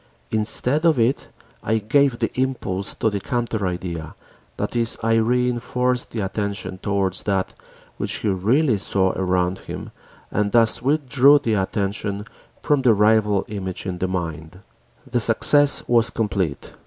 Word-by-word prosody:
Instead 120 +7 +2
of 165 -4 +4
it 120 +4 +1 0.3
I 110 +1 0
gave 125 +4 +2
the - - -1
impulse 125 -7 -2
to 110 - 0
the 100 - -2
counter 115 -2 -2
idea, 90 -3 -5 0.4
that - - -3
is, 115 -1 0
I 115 0 +3
reënforced 125 +1 0
the 115 - -4
attention 100 -1 -4
towards 100 -1 -1
that 95 -2 -1 0.4
which - - -3
he 110 - -2
really 110 - +2
saw 95 -1 +1
around 90 0 -1
him - - -8 0.4
and 105 -1 0
thus 115 -2 +3
withdrew 140 0 +4
the 115 -6 -1
attention 100 +1 -2 0.4
from 145 -2 +2
the 120 -4 +4
rival 105 -1 +3
image 95 -4 -5
in 90 -2 -4
the 95 - 0
mind. 85 -1 -5 0.4
The 120 - -1
success 140 +6 +4
was 120 -1 +3
complete. 100 -10 -3
110 Hz, 145 wpm, -22 LUFS, 95-120 Hz, 0.4 s, of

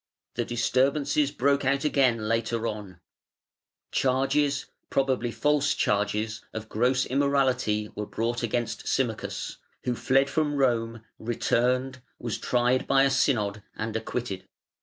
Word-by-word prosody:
The 120 - -1
disturbances 135 +5 +1
broke 140 0 +1
out 140 +1 +1
again 135 -5 +3
later 115 0 0
on; 105 -5 -5 0.9
charges, 135 +2 +1 0.2
probably 130 -3 +1
false 145 +3 +1
charges, 105 +2 0
of 110 -1 -5
gross 125 +3 +2
immorality 130 -6 +1
were 105 0 -5
brought 120 +2 -2
against 120 0 -2
Symmachus, - - -2 0.3
who 125 - 0
fled 135 +3 +2
from 150 0 0
Rome, 115 -4 +1 0.2
returned, 125 +3 0 0.2
was 120 -3 -4
tried 125 +1 +1
by 135 0 +5
a 135 - +3
Synod, 105 -8 +1
and 110 0 -4
acquitted. 110 -3 -4
125 Hz, 120 wpm, -27 LUFS, 115-135 Hz, 0.9 s, by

